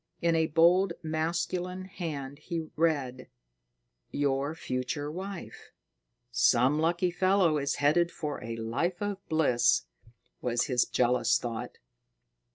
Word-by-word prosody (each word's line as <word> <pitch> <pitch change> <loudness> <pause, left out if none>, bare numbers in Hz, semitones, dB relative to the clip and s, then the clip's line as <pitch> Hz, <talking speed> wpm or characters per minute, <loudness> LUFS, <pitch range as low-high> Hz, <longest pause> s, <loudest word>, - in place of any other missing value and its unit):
In 170 -1 +2
a 160 0 +2
bold, 170 +4 +4
masculine 170 +3 -2
hand, 150 -7 -6
he 170 -2 -4 0.2
read: 145 -6 0 0.8
"Your 140 +1 -1
future 145 +1 -3
wife." 190 +2 -7 0.6
"Some 125 +4 +3
lucky 170 +2 +1
fellow 185 -3 +3
is 140 0 -1
headed 160 +4 +3
for 150 -4 -5
a 115 0 -4
life 130 +11 -2
of 205 -1 -3
bliss," 155 -7 +3 0.6
was 120 -1 +1
his 125 -4 +2
jealous 125 -1 +2
thought. 115 -2 -5
155 Hz, 115 wpm, -29 LUFS, 130-175 Hz, 0.8 s, bold